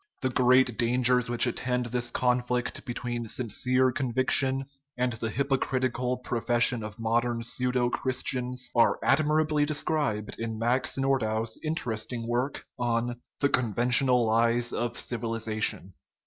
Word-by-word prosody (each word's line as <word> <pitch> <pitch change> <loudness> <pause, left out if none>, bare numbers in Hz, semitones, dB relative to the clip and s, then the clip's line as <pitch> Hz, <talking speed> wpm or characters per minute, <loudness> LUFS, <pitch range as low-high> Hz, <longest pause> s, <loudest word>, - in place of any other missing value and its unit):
The 130 - +1
great 125 -1 +3
dangers 125 0 +2
which 120 +1 +4
attend 125 0 -1
this 120 0 -2
conflict 125 0 -1
between 120 -2 -4
sin 115 -1 -3
cere 130 +2 +2
conviction 130 +1 +1 0.3
and 125 0 0
the 110 0 -4
hypocritical 130 -1 -1
profession 120 0 +2
of 110 -1 -8
mod 115 +1 +1
ern 120 -1 -3
pseudo 125 +1 0
Christians 125 -1 -2
are 120 - +4
admirably 155 +1 +2
described 145 -7 -1
in 115 -1 -4
Max 120 +5 0
Nordau's 115 -5 0
interesting 120 -6 -3
work 125 +4 -2
on 120 0 -1 0.2
The 140 - +3
Conventional 125 +1 +2
Lies 115 +2 +2
of 120 0 -2
Civilization. 110 -5 -2
125 Hz, 125 wpm, -27 LUFS, 115-130 Hz, 0.3 s, which